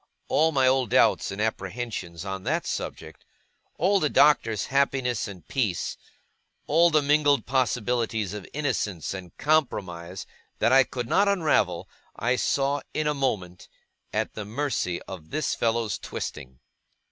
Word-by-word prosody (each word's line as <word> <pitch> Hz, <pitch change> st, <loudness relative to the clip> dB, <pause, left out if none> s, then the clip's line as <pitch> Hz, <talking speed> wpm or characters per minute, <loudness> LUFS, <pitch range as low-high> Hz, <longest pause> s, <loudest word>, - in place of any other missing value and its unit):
All 160 Hz, +1 st, +3 dB
my 135 Hz, -3 st, +3 dB
old 130 Hz, -2 st, +3 dB
doubts 130 Hz, +3 st, +3 dB
and 100 Hz, -, -6 dB
apprehensions 100 Hz, -4 st, -3 dB
on 95 Hz, 0 st, -4 dB
that -, -, -1 dB
subject, -, -, -5 dB, 0.5 s
all 195 Hz, +3 st, +3 dB
the 150 Hz, -, +1 dB
Doctor's 140 Hz, -8 st, +4 dB
happiness 135 Hz, -4 st, 0 dB
and 95 Hz, -4 st, -11 dB
peace, 110 Hz, -11 st, -1 dB, 0.7 s
all 170 Hz, +3 st, +4 dB
the 155 Hz, -2 st, +3 dB
mingled 145 Hz, -3 st, +3 dB
possibilities 120 Hz, -4 st, 0 dB
of 105 Hz, -2 st, -7 dB
innocence 105 Hz, -, -2 dB
and 90 Hz, -3 st, -9 dB
compromise, 95 Hz, -, -1 dB, 0.3 s
that -, -, +2 dB
I 135 Hz, 0 st, +7 dB
could 125 Hz, -2 st, -5 dB
not 200 Hz, +10 st, +3 dB
unravel, 155 Hz, -, +1 dB, 0.3 s
I 125 Hz, +3 st, +1 dB
saw, 140 Hz, +3 st, 0 dB
in 155 Hz, -, 0 dB
a 150 Hz, -, +2 dB
moment, 100 Hz, -11 st, -2 dB, 0.4 s
at -, -, -1 dB
the 110 Hz, -, -5 dB
mercy 110 Hz, -6 st, -2 dB
of 85 Hz, -5 st, -10 dB
this 155 Hz, -1 st, -1 dB
fellow's 115 Hz, -2 st, 0 dB
twisting. 65 Hz, -4 st, -6 dB
120 Hz, 140 wpm, -26 LUFS, 95-145 Hz, 0.7 s, I